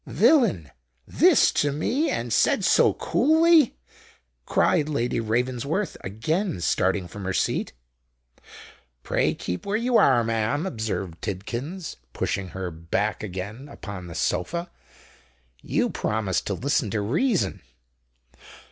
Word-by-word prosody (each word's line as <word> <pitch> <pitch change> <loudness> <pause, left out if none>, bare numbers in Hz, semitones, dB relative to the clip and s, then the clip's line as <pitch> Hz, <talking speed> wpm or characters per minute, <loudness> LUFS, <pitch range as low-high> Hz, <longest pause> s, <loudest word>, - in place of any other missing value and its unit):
"Villain! 225 - +3 0.4
this - - +5
to 145 - +1
me—and 250 - -1
said - - +3
so - - +4
coolly!" 320 -2 +4 0.7
cried 150 0 +2
Lady 125 -6 -1
Ravensworth, 125 - -1
again 115 - -2
starting 95 +2 0
from 100 +2 -9
her 95 0 -2
seat. - - -1 1.3
"Pray - - +1
keep 90 - -5
where 200 +1 -1
you 240 +1 +2
are, 125 -4 +5
ma'am," 115 - -1
observed 110 - -4
Tidkins, 120 - -5 0.2
pushing 95 -1 -2
her 90 0 -5
back 85 +6 -2
again 105 +7 -6
upon 100 -9 -8
the 85 - -9
sofa; 170 - -2 0.9
"you - - 0
promised 105 -4 -2
to 100 - -1
listen 130 -1 0
to 105 - -1
reason." 175 - 0
115 Hz, 115 wpm, -25 LUFS, -, 1.3 s, this